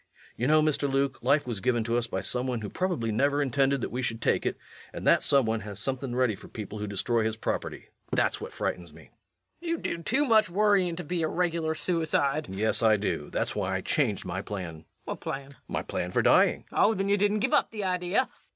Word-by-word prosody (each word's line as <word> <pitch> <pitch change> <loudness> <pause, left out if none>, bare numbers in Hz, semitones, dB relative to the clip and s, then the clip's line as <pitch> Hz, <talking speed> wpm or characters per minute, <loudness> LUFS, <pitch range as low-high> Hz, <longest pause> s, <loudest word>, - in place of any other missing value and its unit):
You 125 - -1
know, 155 +1 +5
Mr. 145 -2 +1
Luke, 135 -1 0
life 145 +1 +3
was 120 -5 -3
given 120 +1 +1
to 115 +1 -1
us 120 -1 0
by - - -3
some 125 +1 -1
one 125 -3 -2
who 105 - -5
probably 175 -12 -1
never 140 +6 +2
intended 135 0 +1
that - - -3
we 125 - -2
should 115 -2 -2
take - - +1
it, - - -2 0.3
and - - -7
that - - +5
some 140 -3 +3
one 110 0 0
has 105 -2 -8
something 130 +2 -3
ready 125 -3 +2
for - - -11
people 105 -1 -7
who 105 - -3
destroy 110 +3 0
his 110 0 -1
property. - - -4 0.2
That's - - +1
what - - -6
frightens 85 -3 -3
me. - - -16 0.5
LUKE. 340 - -5
You 335 - +1
do 170 - -3
too 265 - +1
much 220 -6 +4
worryin' 195 -2 +2
to 175 - -5
be 175 +2 -2
a 160 - +1
regular 165 -2 -1
suicide. 155 -4 0
REVENUE. 95 - -7
Yes, 110 - +1
I 110 -2 +5
do. 105 - -2
That's - - -2
why 95 0 -1
I 95 - -1
changed 110 -5 0
my 95 +1 -3
plan. 90 -6 -6
LUKE. 80 - -18 0.2
What - - -5
plan? 135 - -4
REVENUE. 140 - -15
My - - -3
plan 90 - -3
for - - +1
dying. - - +4
LUKE. - - -2
Oh, 220 - +5
then 195 +1 -1
you 200 +1 +3
didn't 205 +1 +2
give - - +1
up - - +3
the 215 -2 -5
idea? 185 +5 +1
135 Hz, 245 wpm, -28 LUFS, 110-170 Hz, 0.5 s, know